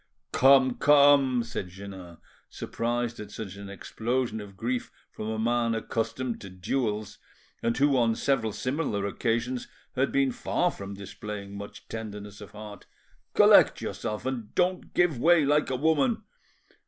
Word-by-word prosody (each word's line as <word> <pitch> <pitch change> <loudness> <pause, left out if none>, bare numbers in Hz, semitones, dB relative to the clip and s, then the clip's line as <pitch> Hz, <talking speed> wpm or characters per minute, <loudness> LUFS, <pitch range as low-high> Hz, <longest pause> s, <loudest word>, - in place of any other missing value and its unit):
"Come, 130 -1 +5
come," 140 -4 +5
said 115 -5 -5
Jeannin, 95 -2 -10 0.3
surprised 120 0 -3
at 105 -1 -7
such 105 -2 -7
an 100 0 -9
explosion 115 +3 -2
of 100 -2 -11
grief 120 +3 -2 0.2
from 105 - -6
a 110 - -2
man 115 0 +1
accustomed 115 +2 -3
to 100 - -8
duels, 105 +3 -2 0.4
and 115 0 0
who 140 0 +3
on 115 -3 +3
several 120 -5 0
similar 125 -2 -2
occasions 120 +4 -1 0.3
had 135 +2 +1
been 135 -1 +2
far 175 +7 0
from 100 0 -8
displaying 100 0 -7
much 100 0 -9
tenderness 105 -2 -7
of 105 - -9
heart, 105 -1 -10 0.5
"collect - - +7
yourself, 105 +2 -4
and 125 -5 -4
don't 180 0 0
give 175 -8 +3
way 165 +2 +5
like 150 +1 +2
a 130 - 0
woman. 140 -3 +2
115 Hz, 145 wpm, -27 LUFS, 105-130 Hz, 0.5 s, collect